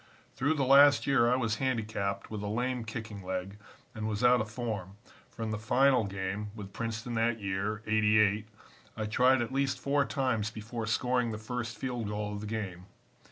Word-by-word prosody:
"Through 145 +5 +1
the 140 -3 +1
last 140 +2 +7
year 120 -4 +4
I - - +4
was 115 -4 0
handicapped 110 -6 -2
with 105 -2 -4
a 105 - -3
lame 120 +2 -1
kicking 110 -2 -6
leg 95 +2 -4 0.3
and 110 -1 -4
was 105 +1 -2
out 125 0 +6
of 110 - -4
form, 110 -5 -4 0.3
for 115 - -7
in 110 - -2
the 105 - -2
final 125 +1 +3
game 100 +1 -4
with 100 -3 -8
Princeton 115 +1 -4
that 115 0 +1
year, 100 +2 -2
'88, 110 -1 +3 0.5
I 110 - -2
tried 125 +4 +3
at 120 - -6
least 135 -1 0
four 140 0 +2
times 125 -7 0
before 110 +1 -6
scoring 125 +1 +1
the 110 - -4
first 120 0 -4
field 120 -2 -3
goal 105 0 -3
of 105 - -5
the 105 - -5
game. 100 -4 -5
110 Hz, 190 wpm, -30 LUFS, 105-125 Hz, 0.5 s, last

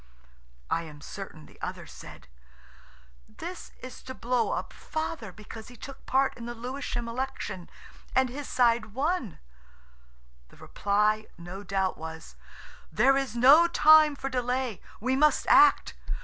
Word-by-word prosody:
I 165 - +2
am 155 -3 -10
certain 155 -1 -9
the - - -19
other - - -5
said, - - -12 1.0
"This 355 +2 -8
is 255 0 -9
to 260 0 -8
blow 245 0 0
up - - -3
Father 315 - -4
because 215 +3 -11
he 245 - -13
took 270 +2 -11
part 265 +1 +2
in 235 0 -7
the 240 - -5
Lewisham 245 0 -4
Election, 230 -7 -4 0.5
and 260 0 +4
his 275 +3 -7
side 235 -3 +2
won." 280 - -1 1.1
The - - -19
reply 210 +2 0
no 175 +3 -8
doubt 195 -1 -1
was, 160 - -8 0.6
"There 250 +11 +4
is 270 -4 -1
no 280 +8 +7
time 310 -2 +6
for 270 - -5
delay; 250 -3 -2 0.2
we 255 +4 0
must 300 0 +3
act. 390 +2 +6
245 Hz, 140 wpm, -28 LUFS, 210-270 Hz, 1.1 s, no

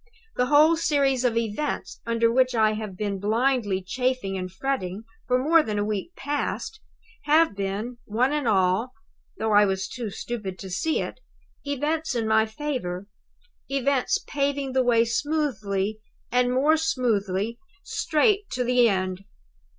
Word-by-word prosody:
The 250 - +1
whole 300 +4 +6
series 275 -5 +2
of 235 -2 +1
events 230 +6 -3
under 230 0 +2
which 255 0 +2
I 220 -1 +4
have 215 -3 -6
been 200 -1 -2
blindly 215 -2 +1
chafing 250 -1 -1
and 185 -1 -4
fretting 195 -3 -3 0.2
for 250 - +3
more 315 +6 +4
than 215 -7 -3
a 205 - 0
week 215 - -4
past 290 +9 -3 0.5
have 310 -5 +4
been, 200 +5 -4
one 245 +6 +1
and 295 -4 -1
all 195 +4 +2 0.4
though 220 0 -1
I 205 0 +6
was 190 0 -1
too 235 +1 -5
stupid 200 -2 -5
to 190 -1 -8
see 315 - 0
it - - -6 0.5
events 295 +1 -1
in 225 -2 0
my 220 0 +3
favor; 220 -8 -4 0.6
events 275 -1 +1
paving 280 -1 -1
the 260 - +3
way 235 -2 +3
smoothly 220 -7 -1 0.3
and 245 +1 +2
more 290 +5 +3
smoothly 230 - 0 0.2
straight 395 +6 +1
to 250 - 0
the 245 -1 +4
end. 185 -1 -2
240 Hz, 150 wpm, -25 LUFS, 205-275 Hz, 0.6 s, whole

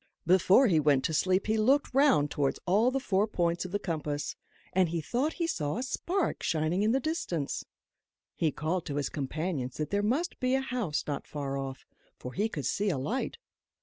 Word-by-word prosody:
Before 185 +8 +5
he 175 -9 +4
went 145 -3 +3
to 160 - -1
sleep 185 +4 +2
he 220 +1 +1
looked 265 +5 +3
round 265 - +4
towards 140 -2 0
all 210 +7 +4
the 270 +1 -1
four 205 -5 +1
points 175 -4 0
of 180 - -6
the 205 - +1
compass, 150 -6 -3 0.4
and 185 -2 +3
he 170 0 -1
thought 250 - -1
he 340 - -1
saw 155 - -1
a 245 - -2
spark 350 +7 -1
shining 160 +4 0
in 215 +2 +3
the 265 - +3
distance. 215 - -2 0.7
He 160 -3 +1
called 155 +6 -2
to 140 - -3
his 145 -1 -1
companions 145 -2 -3
that 150 - -3
there 200 0 +2
must 270 - -1
be 255 +1 +2
a 265 - +1
house 240 - -2
not 145 -2 -4
far 140 -2 -4
off; 135 -1 -5 0.3
for 125 - -7
he 210 +4 0
could 150 -10 -4
see 205 +1 +1
a 165 - 0
light. 210 - -2
185 Hz, 205 wpm, -30 LUFS, 150-240 Hz, 0.7 s, Before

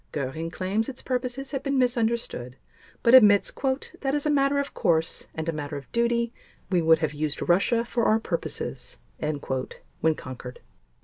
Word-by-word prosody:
Göring 150 +4 -3
claims 195 +6 -1
its 260 - -8
purposes 255 +1 -3
have 270 - -2
been 275 -1 0
misunderstood 235 - 0 0.5
but 235 - +5
admits 210 -6 +7
"that 270 +1 -2
as 295 - -1
a 300 - +3
matter 280 0 +3
of 280 0 -2
course 165 -1 0
and 160 0 -4
a - - +2
matter 145 -1 -4
of 140 - -11
duty 235 0 +1 0.4
we 180 -2 +3
would 160 0 +5
have 155 -1 -1
used 150 0 -2
Russia 215 +7 +3
for 235 -1 0
our 220 - +4
purposes," 135 - -4 0.2
when 150 +1 -2
conquered. 125 -2 -9
205 Hz, 165 wpm, -26 LUFS, 155-250 Hz, 0.5 s, admits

